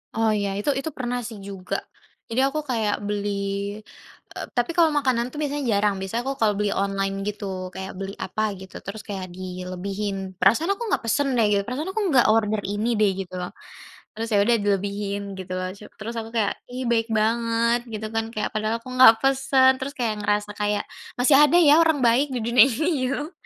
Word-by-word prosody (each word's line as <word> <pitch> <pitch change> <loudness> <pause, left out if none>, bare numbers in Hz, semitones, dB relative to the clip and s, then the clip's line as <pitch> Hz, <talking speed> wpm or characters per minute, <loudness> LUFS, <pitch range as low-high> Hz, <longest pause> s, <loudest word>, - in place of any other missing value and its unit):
Oh, 225 -1 +2
ya. 200 -1 -1
Itu 210 - -1
itu 275 +4 -2
pernah 245 -1 -2
sih 220 -4 -9
juga. 195 -1 -6 0.5
Jadi 230 +3 -2
aku 305 +3 -2
kayak 220 -4 +1
beli 205 0 -2 1.1
eee, - - -4
tapi 245 +6 +1
kalau 335 -2 +6
makanan 255 -4 +1
tuh, - - -10
biasanya 290 -1 -2
jarang. 205 0 +2
Biasanya 195 +5 -2
aku 275 - -1
kalau 215 -2 +4
beli 205 -1 +1
online, 195 0 -1
gitu. 210 -1 -4 0.3
Kayak 190 0 -6
beli 195 0 -5
apa 215 - -2 0.2
gitu, 190 0 -12
terus 210 +2 -6
kayak 195 -3 -5
dilebihin. 185 +2 -4 0.2
Perasaan 270 - +3
aku 470 - -6
nggak - - 0
pesen 275 +5 +1
deh, 225 - +4
gitu. 200 - +3
Perasaan 290 +8 -3
aku 435 +3 -2
enggak 255 -4 +5
order 215 -1 +1
ini 205 +3 -1
deh, 210 -2 +4
gitu 185 -1 -6
loh. 180 - -5 0.6
Terus 225 +1 -4
ya 205 - +4
udah, 235 +2 +4
dilebihin 200 0 -1 0.2
gitu 185 -1 -7
loh. 185 0 -2
Cu 210 - -12 0.2
terus 225 +2 -5
aku 225 - -7
kayak, 210 -3 +2 0.2
"Ih 255 +1 -4
baik 225 0 +1
banget," 230 +1 +1
gitu 215 0 -4
kan. 225 0 +1
Kayak, 210 - -1
padahal 215 +1 -1
aku 255 - -13
nggak 255 -3 +9
pesen, 270 -1 +4
terus 270 +2 -4
kayak 230 -3 0
ngerasa 205 0 0
kayak, 205 0 0 0.3
masih 260 +3 +5
ada 300 +3 +5
ya 295 -4 +7
orang 320 -3 +3
baik 245 +5 +4
di 245 - -1
dunia 235 0 +7
ini 300 +7 -1 0.2
gitu 275 - -1
loh. 310 - -9
220 Hz, 200 wpm, -24 LUFS, 200-250 Hz, 1.1 s, nggak